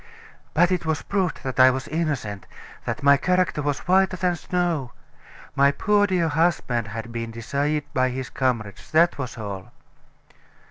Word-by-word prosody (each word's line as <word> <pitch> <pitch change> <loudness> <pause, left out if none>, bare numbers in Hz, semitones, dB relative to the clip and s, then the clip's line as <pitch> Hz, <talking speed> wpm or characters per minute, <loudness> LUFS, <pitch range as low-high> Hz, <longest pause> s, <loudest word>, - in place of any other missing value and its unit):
"But 175 +1 +4
it 180 - 0
was 160 -2 -1
proved 190 -4 -1
that 130 -1 -4
I 130 0 +9
was 130 +1 -2
innocent, 145 -11 -3 0.4
that - - -4
my 140 0 +6
character 180 0 +1
was 145 -1 -1
whiter 190 0 +3
than 180 0 +1
snow. 170 -7 -2 0.6
My 140 +1 +5
poor, 205 +6 +2
dear 180 -4 +1
husband 150 -8 +1
had 115 +2 -6
been 115 0 -4
deceived 140 +6 -2
by 130 0 +2
his 130 0 -5
comrades; 115 -7 -2
that 165 0 +3
was 130 -2 -5
all." 100 0 -6
140 Hz, 155 wpm, -24 LUFS, 125-175 Hz, 0.6 s, I